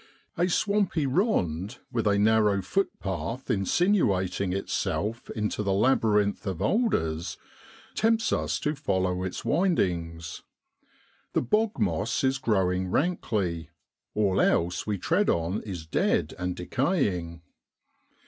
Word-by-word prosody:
A 175 +2 +1
swampy 200 -4 +1
rond, 120 - 0
with 115 -3 0
a 100 0 +3
narrow 105 -2 +3
footpath 115 - -2
insinuating 100 - +1
itself 105 +3 -2
into 105 -1 -2
the 100 -2 0
labyrinth 105 -2 +2
of 95 -4 -3
alders, 95 - 0 0.6
tempts 225 0 +2
us - - -1
to 150 - 0
follow 95 -10 -1
its 95 -1 -4
windings. 85 - 0 0.9
The - - +1
bog 215 - +1
moss 100 0 0
is 135 0 +2
growing 95 -5 +1
rankly, 100 - -1 0.5
all 100 -3 +2
else 90 +4 +1
we 105 -1 0
tread 180 - +1
on 85 +4 0
is 90 -6 -6
dead 80 - +1
and 90 0 -2
decaying. 90 - -1
100 Hz, 115 wpm, -27 LUFS, 90-140 Hz, 0.9 s, a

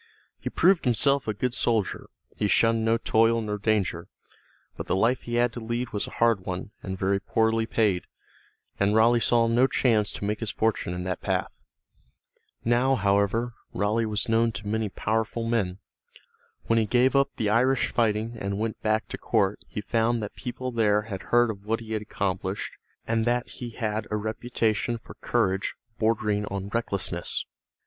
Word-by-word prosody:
He - - -4
proved 185 -4 +3
himself 140 +3 +3
a 110 - 0
good 125 +4 -1
soldier; 115 -5 0 0.3
he 105 - 0
shunned 115 +3 +3
no 115 +1 +3
toil 115 0 +3
nor 105 -2 -3
danger. 100 -6 0 0.7
But - - -6
the - - +1
life 115 +6 +2
he 120 - -4
had 120 0 +2
to - - -5
lead 120 +2 -3
was 105 - -2
a - - -10
hard 115 -3 +4
one, 90 +3 -5
and 95 -1 -5
very 100 +1 +1
poorly 110 +2 +1
paid, 105 -6 +1 0.7
and 100 +2 +2
Raleigh 115 +2 +5
saw 115 0 +3
no 120 +3 +4
chance 110 -7 +2
to - - -5
make 105 +1 -1
his 115 - -2
fortune 110 -6 -1
in 90 - -4
that 90 -1 -3
path. - - -1 1.1
Now, 125 +3 +3
however, 100 +3 +1 0.2
Raleigh 110 +2 +1
was 105 -1 -1
known 115 0 +3
to 100 +2 -6
many 110 0 -1
powerful 110 +3 -1
men. 100 -6 0 0.9
When 115 0 +2
he 110 - +1
gave 125 +4 +3
up 140 0 +2
the 105 -2 0
Irish 130 +4 +2
fighting 115 0 0
and 100 0 -2
went 110 +1 -3
back 110 0 0
to - - -6
court 100 +1 +1
he 105 - -5
found 115 +1 +1
that 105 - -6
people 130 0 -5
there 105 -3 +2
had 100 -4 -6
heard 120 -1 +4
of 100 -1 -11
what 115 +1 0
he 110 -1 -6
had 110 - -1
accomplished 95 -2 -3 0.3
and 115 0 +1
that 120 +1 0
he 120 - -6
had 110 -2 -3
a 105 - -1
reputation 110 +1 -1
for 115 - -13
courage 95 +1 0 0.2
bordering 105 -2 +1
on 100 0 -4
recklessness. 100 -3 -1
110 Hz, 180 wpm, -26 LUFS, 105-115 Hz, 1.1 s, Raleigh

